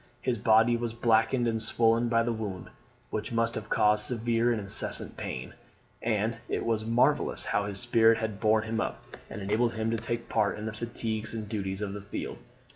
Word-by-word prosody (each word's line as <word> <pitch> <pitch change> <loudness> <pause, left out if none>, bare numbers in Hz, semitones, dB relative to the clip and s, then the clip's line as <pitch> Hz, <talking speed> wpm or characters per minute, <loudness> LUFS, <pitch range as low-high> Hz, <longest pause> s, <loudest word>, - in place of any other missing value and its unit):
His 120 -3 -1
body 110 +3 +4
was 115 -1 -4
blackened 115 +1 +2
and 115 -1 -1
swollen 115 +1 +2
by 115 0 +3
the 120 0 -1
wound, 105 -5 -6 0.4
which 110 +5 -3
must 115 0 +1
have 105 -1 -6
caused 105 0 +3
severe 120 0 +1
and 115 - 0
incessant 100 -1 +1
pain; - - -6 0.5
and 110 0 0
it - - -2
was 110 -2 0
marvellous 125 +6 +2
how 100 - 0
his 100 -1 -2
spirit 115 -2 +4
had 110 -3 -4
borne 110 -1 +3
him 115 0 -2
up, - - -4 0.3
and 100 - -6
enabled 115 +4 +1
him 110 0 -1
to 115 - 0
take 115 +1 -3
part 105 -3 +1
in 105 - -6
the 110 - -4
fatigues 110 -1 -4
and 110 -2 -5
duties 100 -2 -3
of 100 -1 -4
the 105 - -6
field. 100 - -6
115 Hz, 200 wpm, -28 LUFS, 105-115 Hz, 0.5 s, body